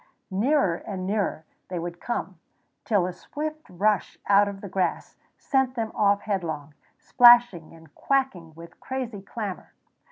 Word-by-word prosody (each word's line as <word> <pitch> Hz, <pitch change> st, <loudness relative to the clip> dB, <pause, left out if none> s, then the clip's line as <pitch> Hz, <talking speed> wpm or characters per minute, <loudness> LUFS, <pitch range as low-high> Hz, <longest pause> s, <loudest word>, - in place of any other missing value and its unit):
Nearer 205 Hz, -, +2 dB
and 185 Hz, -2 st, -6 dB
nearer 195 Hz, -5 st, -1 dB, 0.2 s
they 180 Hz, -, -5 dB
would 175 Hz, 0 st, -6 dB
come, 195 Hz, -7 st, -4 dB, 0.5 s
till 200 Hz, -5 st, +2 dB
a 180 Hz, -, -4 dB
swift 310 Hz, -, -6 dB
rush 200 Hz, +3 st, 0 dB
out 200 Hz, 0 st, +5 dB
of 200 Hz, -1 st, -6 dB
the 200 Hz, -, -7 dB
grass 185 Hz, 0 st, -2 dB, 0.2 s
sent 265 Hz, -2 st, 0 dB
them 225 Hz, -2 st, -2 dB
off 200 Hz, -1 st, +2 dB
headlong, 160 Hz, -8 st, -3 dB, 0.2 s
splashing 240 Hz, -10 st, +5 dB
and 160 Hz, -3 st, -18 dB
quacking 225 Hz, -, -1 dB
with 165 Hz, +1 st, -13 dB
crazy 250 Hz, -6 st, -5 dB
clamor. 200 Hz, -1 st, -6 dB
200 Hz, 140 wpm, -25 LUFS, 175-240 Hz, 0.5 s, out